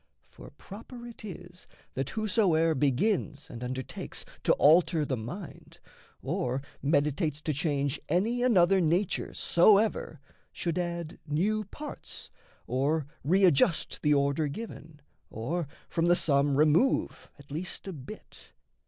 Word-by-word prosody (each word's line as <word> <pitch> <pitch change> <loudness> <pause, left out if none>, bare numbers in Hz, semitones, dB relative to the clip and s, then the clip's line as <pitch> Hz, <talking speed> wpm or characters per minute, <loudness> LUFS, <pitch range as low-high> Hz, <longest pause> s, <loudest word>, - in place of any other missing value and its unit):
For - - -12
proper 235 +4 -10
it 235 -2 -11
is 180 -3 -10 0.3
That 135 0 -2
whosoe'er 185 -7 +2
begins 145 - 0
and 120 +1 -7
undertakes 130 0 -5 0.2
To - - +5
alter 160 0 +4
the 135 - -1
mind, 135 - -8 0.5
or 130 +2 -2 0.2
meditates 150 +1 +1
to 155 - 0
change 145 -2 -1
Any 215 +9 +1
another 195 -6 +4
nature 175 +4 +1
soever, 200 -3 +3 0.3
should 170 0 -2
add 170 -2 -4
New 205 +9 0
parts, 295 +9 -8 0.3
or 140 +4 0 0.2
readjust 170 0 +3
the 150 -1 +3
order 140 +2 +1
given, 155 -3 -8 0.3
Or 150 +9 -3 0.2
from 165 - 0
the 175 - +5
sum 140 -3 +2
remove 155 - +2
at 140 -1 -16
least 175 +6 -5
a 190 - -4
bit. 150 +8 -12
160 Hz, 125 wpm, -29 LUFS, 145-190 Hz, 0.5 s, To